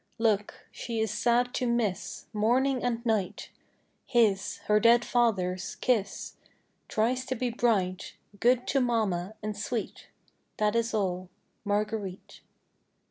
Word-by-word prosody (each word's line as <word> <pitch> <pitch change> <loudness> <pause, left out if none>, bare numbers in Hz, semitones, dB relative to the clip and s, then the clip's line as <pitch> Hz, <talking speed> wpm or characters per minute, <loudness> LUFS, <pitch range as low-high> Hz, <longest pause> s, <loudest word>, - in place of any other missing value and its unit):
Look. 215 -3 0
She 230 -2 -4
is 220 -2 0
sad 240 +3 +2
to 250 - -1
miss, 235 -6 -1
Morning 250 +5 +2
and 240 -1 -1
night, 215 -5 -1 0.6
His 215 -6 +2
her 210 0 +4
dead 235 +1 +5
father's 190 -7 0
kiss, 215 -6 -1 0.5
Tries 245 +4 0
to 260 - -1
be 245 0 -1
bright, 195 -6 0 0.2
Good 250 +2 +3
to 275 - +3
mamma, 215 -5 0
and 210 0 -3
sweet. 215 +2 -4 0.5
That 210 +1 +1
is 230 0 +1
all. 185 -3 -1 0.4
"_Marguerite. 205 -2 -2
220 Hz, 125 wpm, -28 LUFS, 205-240 Hz, 0.6 s, dead